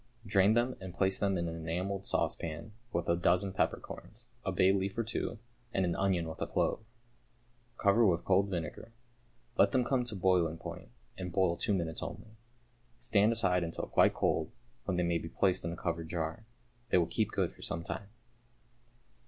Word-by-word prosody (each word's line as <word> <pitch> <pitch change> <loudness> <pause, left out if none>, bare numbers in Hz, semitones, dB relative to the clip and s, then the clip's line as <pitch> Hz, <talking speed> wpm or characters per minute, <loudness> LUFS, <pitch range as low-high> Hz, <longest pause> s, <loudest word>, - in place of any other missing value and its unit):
Drain 100 +1 +4
them 120 +2 +2
and 95 -2 -7
place 95 +1 +1
them 100 -2 +1
in 85 0 -1
an 85 - -4
enamelled 90 +5 -3
saucepan 80 +6 -1 0.2
with 85 - -1
a 85 - +3
dozen 90 +2 +2
peppercorns, - - -3
a - - -1
bay 95 +1 +4
leaf 95 +1 -1
or 115 - +1
two, 115 +1 -3 0.4
and 95 - +3
an 85 -1 0
onion 95 -4 +1
with 80 - -7
a - - 0
clove. - - +1 1.0
Cover 100 +3 +4
with 85 -2 +1
cold 100 +1 +4
vinegar. 90 +5 -5 0.7
Let 100 0 +5
them 130 - +4
come 125 0 +1
to 115 -3 -3
boiling 90 -3 +2
point, 80 - -8 0.3
and 90 -1 -4
boil 90 -1 +2
two 105 +3 +1
minutes 80 -3 -2
only. 110 - -7 0.6
Stand 105 +1 +3
aside 90 -6 +2
until 85 0 -3
quite - - +4
cold, - - +1 0.4
when 95 -2 -1
they 90 - +2
may 85 -1 +1
be 85 - -7
placed 95 0 +1
in 85 - -2
a 85 - -6
covered 85 -2 -3
jar. 85 +7 -3 0.4
They - - +4
will 85 - +4
keep - - 0
good - - -1
for - - -17
some 85 0 -3
time. 100 +3 -5
95 Hz, 185 wpm, -32 LUFS, 85-100 Hz, 1.0 s, Let